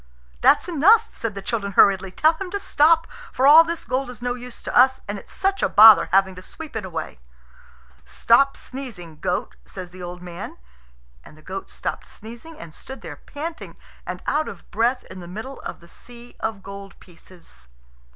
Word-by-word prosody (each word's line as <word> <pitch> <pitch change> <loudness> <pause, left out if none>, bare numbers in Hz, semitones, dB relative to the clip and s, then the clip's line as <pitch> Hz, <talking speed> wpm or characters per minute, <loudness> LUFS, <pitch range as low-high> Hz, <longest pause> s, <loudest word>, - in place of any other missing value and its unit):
"That's - - +4
enough," 405 +8 +4
said 225 -3 -5
the 195 - -7
children 200 -3 -3
hurriedly; 195 0 +4
"tell 310 - +3
him 365 +3 -7
to 405 - -3
stop, 325 -2 +3 0.3
for 260 - 0
all 305 +4 +9
this 335 0 -5
gold 255 0 -2
is 245 -3 -10
no 245 0 -2
use 245 0 -10
to - - -5
us, 260 +1 +5
and 205 0 -4
it's - - -18
such 390 0 -1
a - - +2
bother 220 0 +8
having 190 0 +3
to 185 - -11
sweep 310 - -11
it 220 - -3
away." 180 - -6 0.8
"Stop 240 - +2
sneezing, 195 - -9
goat," - - -2
says 180 - -9
the 185 0 -12
old 180 0 -8
man; 175 -1 -8 0.7
and 155 - -16
the 155 - -19
goat 190 +4 -7
stopped - - -5
sneezing, 235 +9 -12
and 165 -2 -11
stood 265 +9 -11
there 160 -4 -9
panting 320 - -8 0.3
and - - -7
out 310 +1 0
of - - -11
breath 235 +4 0
in 185 - -9
the 175 - -10
middle 220 +9 -8
of - - -8
the 170 - -17
sea 240 +6 -14
of 220 -3 -4
gold 200 0 -10
pieces. 170 - -18
225 Hz, 190 wpm, -22 LUFS, 185-275 Hz, 0.8 s, all